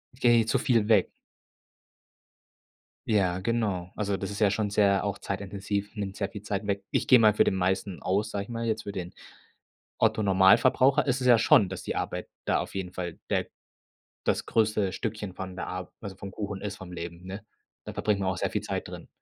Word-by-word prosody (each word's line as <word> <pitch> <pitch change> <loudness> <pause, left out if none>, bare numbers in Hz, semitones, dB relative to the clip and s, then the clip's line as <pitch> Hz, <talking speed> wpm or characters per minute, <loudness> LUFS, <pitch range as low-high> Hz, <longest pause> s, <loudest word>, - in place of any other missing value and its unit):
Gehen 120 -3 +4
zu - - +2
viel 115 -6 +2
weg. 105 -5 +4 2.0
Ja, 95 -5 +2
genau. 95 -4 -1
Also, 100 -2 -1
das 95 - -4
ist 100 - -5
ja 105 -3 +4
schon 105 +1 0
sehr 100 -1 +3
auch 100 -1 -2
zeitintensiv, 100 +1 -4
nimmt 100 -2 -4
sehr 100 -2 -2
viel 105 - -8
Zeit 100 0 -3
weg. 100 -1 -1
Ich - - 0
gehe 130 -3 +8
mal 110 -2 +6
für - - +4
den 95 - +1
meisten 95 0 -1
aus, 100 +4 0
sage 100 -1 -3
ich 105 - -15
mal, 115 0 -3
jetzt 110 -1 -1
für 100 - -5
den 90 -2 -6 0.9
Otto 110 - +2
Normalverbraucher 100 +9 +5
ist 135 -1 0
es 125 - +1
ja 120 -2 +8
schon, 105 -3 +5
dass 95 - -6
die - - -3
Arbeit - - -3 0.2
da - - +2
auf - - -5
jeden 95 -2 -3
Fall 85 -2 -5
der - - 0 0.8
das - - +1
größte 105 -4 +1
Stückchen 105 -2 -4
von 95 0 -7
der - - -4
Arb 90 0 -5
also 100 -3 -6
vom 100 +1 -8
Kuchen 100 0 -5
ist 105 0 -5
vom 95 -3 -10
Leben, 85 0 -7
ne? 95 +2 -7 0.4
Da - - -7
verbringt 105 -2 0
man 95 - 0
auch 95 - -1
sehr - - -1
viel - - -1
Zeit - - -3
drin. - - -9
100 Hz, 210 wpm, -28 LUFS, 95-110 Hz, 2.0 s, gehe